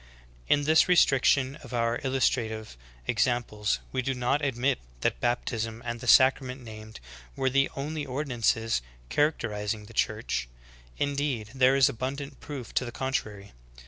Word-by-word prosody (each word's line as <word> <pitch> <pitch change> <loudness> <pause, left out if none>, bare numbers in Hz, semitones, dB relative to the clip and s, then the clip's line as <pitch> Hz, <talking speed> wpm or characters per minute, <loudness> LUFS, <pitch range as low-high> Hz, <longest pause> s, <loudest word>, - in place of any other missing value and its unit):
In 145 - +3
this 155 +2 +5
restriction 135 -5 +4
of 125 - -8
our 115 0 +1
illustrative 115 - 0 0.3
examples 110 - 0
we 130 - 0
do 135 +1 -2
not 125 +4 0
admit 130 - +1 0.2
that - - 0
baptism 115 - -1
and 120 0 -3
the 125 - -8
sacrament 130 +2 +5
named 110 -2 -10 0.4
were 130 -1 0
the 135 +1 +3
only 150 +2 -3
ordinances 120 - 0 0.3
characterizing 110 -8 0
the 115 - -14
Church; 105 - -1 0.5
indeed, 140 -6 -1
there 130 0 +4
is 135 -1 +6
abundant 140 +2 -4
proof 135 -6 -7
to - - +1
the 120 - -5
contrary. 115 -7 -3
125 Hz, 140 wpm, -28 LUFS, 110-135 Hz, 0.5 s, is